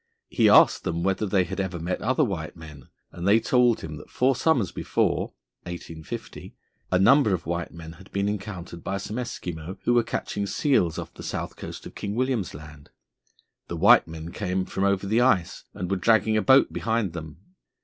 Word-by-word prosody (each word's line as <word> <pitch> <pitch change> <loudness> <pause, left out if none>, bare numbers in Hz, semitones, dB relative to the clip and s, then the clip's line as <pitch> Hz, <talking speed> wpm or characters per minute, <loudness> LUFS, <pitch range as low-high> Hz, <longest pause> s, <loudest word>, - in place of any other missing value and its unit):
He - - +3
asked - - +6
them 85 0 -2
whether 95 +3 0
they 95 -2 +2
had 95 +2 -6
ever 95 -2 -2
met 85 +2 -3
other 130 +4 +2
white 90 - -3
men, 75 -5 -12 0.2
and 85 +2 -5
they 105 +3 +6
told 125 -1 +3
him 75 -1 -7
that - - -12
four 130 +1 +2
summers 125 - +1
before - - -1 0.3
(1850) 85 -2 -8 0.4
a 90 - +4
number 110 +1 +5
of 85 - -8
white 85 +1 -3
men 80 -1 -10
had 90 +4 -15
been 100 0 0
encountered 95 -5 -5
by 100 - -2
some 105 +3 -5
Eskimo 90 -7 -5
who 120 - +2
were 120 - +5
catching 100 -3 -3
seals 100 - +1
off - - -6
the - - -11
south - - -4
coast - - -8
of - - -9
King 100 +1 -5
William's 125 - -1
Land. 75 0 -12 0.8
The - - -5
white - - +6
men 80 +1 -8
came 95 -2 -2
from 95 - -2
over 100 0 +1
the 110 +4 +2
ice, 105 -9 +1
and 90 +1 -4
were 95 - +1
dragging 110 +2 +3
a 110 - +3
boat 130 +6 +5
behind 110 -6 -1
them. 80 -2 -8
95 Hz, 195 wpm, -25 LUFS, 85-110 Hz, 0.8 s, asked